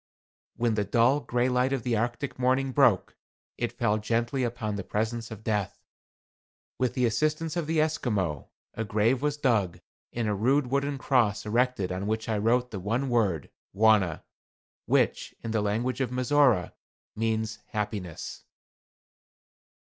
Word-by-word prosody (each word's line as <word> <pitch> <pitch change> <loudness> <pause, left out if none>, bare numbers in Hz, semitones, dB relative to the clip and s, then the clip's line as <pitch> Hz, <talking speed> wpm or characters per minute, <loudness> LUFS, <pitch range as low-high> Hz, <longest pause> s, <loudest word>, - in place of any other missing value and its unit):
When 120 -1 +1
the 105 -1 +1
dull, 120 +7 +3
gray 120 -3 0
light 125 +1 +1
of 135 -4 -1
the 120 -2 0
Arctic 120 +5 -2
morning 130 +1 +2
broke, 125 -8 +3 0.4
it 120 -1 -1
fell 115 -3 0
gently 120 +4 0
upon 115 -3 -2
the 100 - -4
presence 110 +3 -2
of 110 -2 -9
Death. 105 -3 -1 1.0
With 125 -1 0
the 125 -2 +2
assistance 155 +7 0
of 170 -3 -2
the 160 0 +1
Esquimaux, 105 - -1 0.2
a 110 - -3
grave 110 +5 +1
was 150 0 0
dug, 110 - +1 0.3
and 115 -2 -2
a 105 - +1
rude 130 +8 +2
wooden 140 +1 0
cross 115 -7 +1
erected 115 -4 +1
on 95 +2 -3
which 110 +1 -2
I 110 -2 0
wrote 120 +3 +1
the 100 - -4
one 115 +8 -1
word 100 - 0 0.2
"Wauna," 105 -6 +3 0.6
which, - - +1
in 115 - -3
the 110 -1 +1
language 115 +6 -1
of 130 - 0
Mizora, 125 -6 +2 0.4
means 110 0 -1
"Happiness." 100 -5 -5
115 Hz, 150 wpm, -27 LUFS, 105-130 Hz, 1.0 s, dull